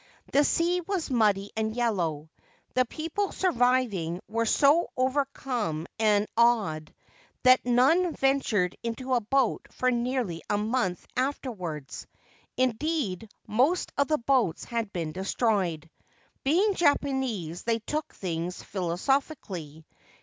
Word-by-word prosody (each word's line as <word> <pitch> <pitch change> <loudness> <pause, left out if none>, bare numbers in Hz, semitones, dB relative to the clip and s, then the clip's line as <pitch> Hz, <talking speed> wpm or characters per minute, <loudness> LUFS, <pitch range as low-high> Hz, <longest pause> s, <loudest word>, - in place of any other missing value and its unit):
The 285 - +5
sea 345 +4 +1
was 355 -4 -3
muddy 205 -4 +2
and 220 0 -1
yellow. 170 -11 -1 0.4
The 255 0 +3
people 330 - -3
surviving 245 - +1
were 230 +2 -1
so 295 +8 +4
overcome 255 - -1
and 210 -2 +3
awed 215 -10 +2 0.5
that 255 0 +6
none 305 +9 +3
ventured 245 -9 +1
into 255 +3 -3
a 245 - +3
boat 255 +2 0
for 255 0 0
nearly 240 -8 -1
a 205 - +2
month 210 -4 -1
afterwards; 210 - -4 0.5
indeed, 255 - -1 0.2
most 275 +12 +1
of 280 - +2
the 305 - +2
boats 240 - +1
had 230 -3 -3
been. 165 -5 -3
destroyed. 190 -3 0 0.6
Being 370 +9 +3
Japanese, 265 - 0
they 230 -1 0
took 300 +7 -4
things 175 -1 -4
philosophically. 180 - -2
235 Hz, 115 wpm, -27 LUFS, 185-270 Hz, 0.6 s, that